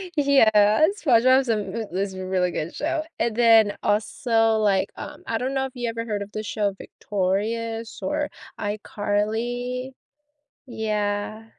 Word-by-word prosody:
Yeah. 225 -4 +5 0.2
SpongeBob's 255 -1 +4
a - - +4
m 205 -3 -3 0.2
is 195 0 -1
a 185 0 -6
really 185 -1 0
good 170 +1 -4
show, 315 +1 -1 0.2
and 230 -1 0
then 225 -3 +5
also, 225 +1 +2
like, 200 -3 +2
um, - - -8
I 225 - 0
don't 260 +2 -2
know 265 0 +1
if 265 - -8
you 240 -2 -2
ever 230 0 -4
heard 210 -3 -3
of 200 +1 -7
the 215 - -4
show 205 -1 -1
Victorious 225 +4 -3
or 295 0 -1 0.3
iCarly? 220 +5 -2 0.7
Yeah. 215 -2 -2
220 Hz, 145 wpm, -24 LUFS, 205-245 Hz, 0.7 s, Yeah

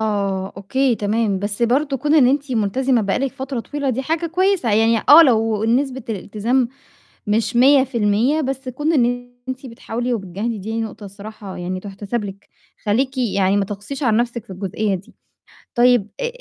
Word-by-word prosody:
آه، 200 -3 -1
أوكي، 245 +6 +1
تمام، 210 -1 0
بس 205 +3 -3
برضه 270 +4 +2
كون 295 +4 +1
إن 275 -5 +6
أنتِ 280 +1 0
ملتزمة 240 +3 +1
بقى 200 -2 0
لِك 270 -1 -1
فترة 265 -2 -4
طويلة 285 +2 -3
دي 255 +2 -2
حاجة 325 +4 -1
كويسة، 365 - +1
يعني 225 +1 +4
آه 320 +3 +10
لو 225 -5 +2
نسبة 260 +3 0
الإلتزام 225 +5 -1 0.6
مش 225 +3 0
100%، 260 0 +3
بس 265 -1 -3
كون 295 +6 -1
إن 245 -3 0 0.2
أنتِ 260 +1 -5
بتحاولي 240 +1 -3
وبتجاهدي 205 +2 -4
دي 220 +4 -3
نقطة 220 -1 -6
الصراحة 200 0 -9
يعني 185 +1 -4
تُحتسب 205 +3 -4
لِك، 200 0 -9 0.4
خلّيكِ 260 +5 +1
يعني 200 -5 +1
ما 200 - +2
تقسيش 205 +9 -6
على 230 -5 +3
نفْسِك 235 -1 -1
في 195 - -10
الجزئية 195 +2 -2
دي. 190 +1 -9 0.6
طيب 240 -4 +4
آآ - - 0
230 Hz, 170 wpm, -20 LUFS, 205-265 Hz, 0.6 s, آه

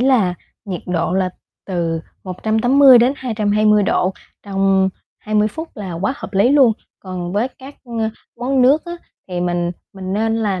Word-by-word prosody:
là 245 -9 +3 0.3
nhiệt 185 -4 -5
độ 175 -1 -1
là 185 -1 +1 0.4
từ 170 -3 -1 0.2
180-220 220 0 +3
độ 190 -1 +1 0.3
trong 195 -1 +2 0.3
20 215 0 +1
phút 320 +9 -7
là 195 -4 -5
quá 190 +9 -1
hợp 195 - -8
lý 200 +5 +4
luôn. 275 -5 +6 0.3
Còn 180 -2 -6
với 215 +6 0
các, 265 +2 -13
a, 225 -2 -2 0.3
món 260 +1 +2
nước 280 +5 +4
á, 345 - -6 0.4
thì 180 -1 -3
mình 175 0 -1 0.2
mình 190 -1 -6
nên 225 +2 0
là 205 -4 -1
210 Hz, 155 wpm, -19 LUFS, 185-245 Hz, 0.4 s, luôn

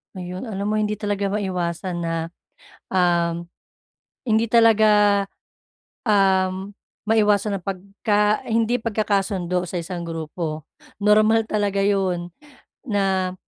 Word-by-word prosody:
Ayun 180 +2 -6
alam 205 -3 -4
mo 215 - 0
hindi 210 -1 -1
talaga 205 -1 -1
maiwasan 180 -3 -2
na 165 - -2 0.8
uhm, 170 -2 +1 0.8
hindi 220 +1 +3
talaga 210 -3 +5 0.8
uhm 190 -2 +2 0.4
maiwasan 210 -2 +2
ang 175 - -20
pagka 205 +2 0
hindi 230 +2 +2
pagkakasundo 195 -5 0
sa 180 - -3
isang 175 0 -6
grupo. 160 -1 -5 0.4
Normal 215 +2 +4
talaga 205 -2 0
yun 185 -3 0 0.6
na, 190 -3 0
200 Hz, 100 wpm, -22 LUFS, 180-210 Hz, 0.8 s, talaga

